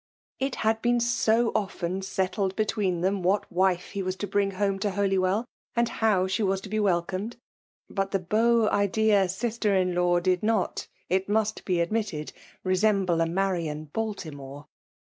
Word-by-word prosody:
It 270 0 -1
had 220 0 +2
been 240 0 +2
so 235 -1 +2
often 190 -3 -2
settled 190 0 -1
between 200 -5 0
them 190 +2 0
what 190 +4 0
wife 180 0 +1
he 200 - -3
was 185 0 -2
to 205 - -4
bring 200 0 +1
home 195 -1 0
to 205 - 0
Holy 195 0 +1
wellj 190 +5 +1 0.3
and 235 0 +2
how 210 -5 +2
she 190 +4 -1
was 195 -2 +1
to 200 - -9
be 215 +1 -1
welcomed; 190 +3 -1 0.5
but 195 -1 -2
the 195 - +1
beau 220 +5 +2
ideal 200 -1 +3
sister 215 +1 0
in 185 -1 +2
law 175 0 +2
did 180 0 +1
not, 215 -3 0 0.2
it 190 +2 0
must 215 0 0
bo 185 - 0
admittedj 175 -3 -1 0.3
resemble 185 -2 +2
a 165 - +2
Marian 165 -5 -2
Baltimore. 150 -10 -5
195 Hz, 165 wpm, -27 LUFS, 180-215 Hz, 0.5 s, ideal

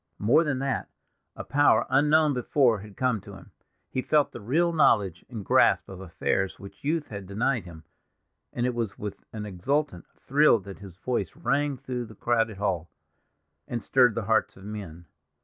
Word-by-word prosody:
More 120 +10 +4
than 145 -4 -1
that, 135 0 -2 0.5
a - - -6
power 145 +1 +3
unknown 150 +1 +4
before 125 -2 +2
had 105 0 -12
come 125 -5 0
to - - -11
him; - - -15 0.4
he 130 - -1
felt 150 +2 +2
the 120 - -9
real 165 +10 +1
knowledge 100 - +3
and 110 -6 -7
grasp - - +4
of 95 -1 -9
affairs 95 +1 -1
which 100 +8 -13
youth 155 +1 -1
had 100 -3 -7
denied 110 +3 -1
him, 80 -2 -11 0.7
and 120 - -2
it 125 - 0
was 115 -4 -3
with 105 -1 -7
an 105 -1 -6
exultant 105 - -2
thrill 145 -1 +4
that 100 0 -10
his 95 -3 -12
voice 105 -6 -2
rang 140 +2 0
through 125 -2 -5
the 110 -1 -13
crowded 115 -2 0
hall, 95 -5 -2 0.8
and 115 -3 -4
stirred 125 0 +4
the 115 - -2
hearts 110 -2 +1
of 95 - -14
men. 95 -5 -8
115 Hz, 180 wpm, -27 LUFS, 100-135 Hz, 0.8 s, More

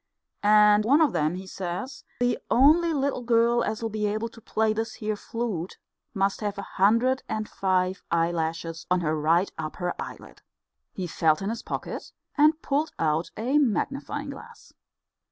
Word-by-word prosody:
And 210 0 +6
of 285 +4 +4
them, 155 +3 +1
he 190 +1 -7
says, 190 +9 -5 0.2
the 245 0 +2
only 315 +7 +5
little 280 -3 -1
girl 235 0 +3
as'll 225 +1 -2
be 215 -1 -2
able 215 +3 -2
to 230 - -16
play 220 0 0
this 225 +1 -3
here 215 0 -2
flute 205 -5 -4 0.4
must 195 +1 0
have 205 -1 -3
a 200 - -4
hundred 230 +8 +2
and 215 -1 -2
five 185 0 0
eyelashes 165 -1 -1
on 180 0 +2
her 155 -1 0
right 165 +5 +2
upper 175 +3 -3
eyelid." - - -9 0.5
He 185 - -5
felt 160 0 +1
in 200 - -1
his 230 - -5
pocket - - -6 0.2
and 310 +1 +4
pulled 290 +3 0
out 160 +1 0
a 260 +7 +2
magnifying 280 +3 -1
glass. 460 - -13
215 Hz, 155 wpm, -26 LUFS, 180-245 Hz, 0.5 s, And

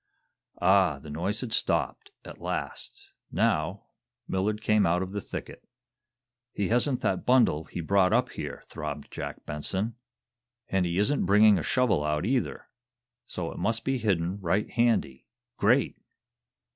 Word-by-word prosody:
Ah, 95 -4 +4
the 75 +1 -10
noise 95 +8 -1
had 120 -4 -4
stopped, - - 0 0.2
at - - -10
last. - - -5 0.2
Now, - - 0 0.4
Millard 105 +3 0
came 105 -2 +3
out 90 +2 +2
of 95 +1 -7
the 100 - -2
thicket. - - -8 0.9
"He 100 - -1
hasn't 125 +3 +2
that 95 - 0
bundle 120 -12 +3
he 85 - -6
brought 95 +2 +3
up - - +2
here!" - - -6
throbbed 75 0 -6
Jack - - -6
Benson. 95 +9 -3 0.7
"And 95 -2 +1
he 85 +1 -2
isn't 105 +1 +1
bringing 105 0 +6
a - - -3
shovel 125 - +2
out, 75 +2 0
either, 125 +2 -1 0.6
so 85 -2 -4
it - - -8
must 115 +6 0
be 135 -1 0
hidden 95 -3 0
right 95 +3 0
handy. 115 - +1 0.3
Great!" 120 +7 +2
100 Hz, 145 wpm, -28 LUFS, 85-110 Hz, 0.9 s, bringing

